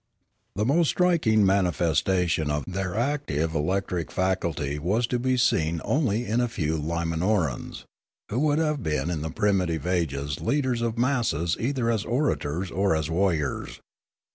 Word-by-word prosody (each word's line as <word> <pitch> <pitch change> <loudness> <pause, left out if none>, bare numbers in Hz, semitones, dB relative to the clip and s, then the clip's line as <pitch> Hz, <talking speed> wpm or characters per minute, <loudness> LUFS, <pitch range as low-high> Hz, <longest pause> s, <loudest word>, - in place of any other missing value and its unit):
The 105 +2 0
most 160 +6 +3
striking 155 - +3
manifestation 90 -3 +1
of 75 -1 -1
their 95 0 -3
active 115 - -1
elec 85 +6 0
tric 85 -4 -3
faculty 85 -6 -1
was 100 +10 +1
to 125 +1 -1
be 130 +1 +1
seen 85 -8 +2
only 120 -6 +1
in 115 +2 +1
a 120 - +1
few 80 -9 -2
Limanorans, 85 - -1 0.5
who 115 - -1
would 150 0 +2
have 150 -3 0
been 75 - -1
in 80 -4 -2
the 80 - -3
primitive 90 -5 0
ages 70 -6 -1
leaders 130 -4 0
of 115 -1 -1
masses 115 - +1
either 120 -1 0
as 110 -3 0
orators 95 - -1
or 95 -1 +1
as 80 0 -2
warriors. 80 -6 -1
95 Hz, 150 wpm, -26 LUFS, 80-120 Hz, 0.5 s, most